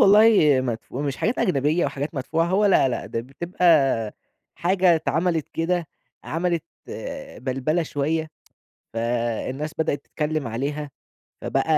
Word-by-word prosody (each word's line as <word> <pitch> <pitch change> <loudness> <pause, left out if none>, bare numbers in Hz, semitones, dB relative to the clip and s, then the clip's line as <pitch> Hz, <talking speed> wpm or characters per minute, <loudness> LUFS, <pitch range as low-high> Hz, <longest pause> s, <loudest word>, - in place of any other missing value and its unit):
والله 200 -9 +6
مدفو 125 +2 -4
مش 140 -2 -2
حاجات 225 +4 0
أجنبية 155 0 +2
أو - - +2
حاجات 140 +3 -4
مدفوعة، 155 +5 0
هو 190 +4 +2
لا، 190 -8 +5
لأ. 125 - -3
ده 115 - -3
بتبقى 135 -4 +2 0.4
حاجة 180 0 +3
اتعملت 160 0 0
كده 170 +1 -1 0.4
عملت 170 0 -1 0.7
بَلْبَلة 135 +6 -1
شوية، 155 +1 -1 0.6
فالناس 120 +5 -2
بدأت 155 -2 +1
تتكلّم 155 -2 -2
عليها. 140 +6 -3 0.5
فبقى - - 0
150 Hz, 120 wpm, -24 LUFS, 135-170 Hz, 0.7 s, والله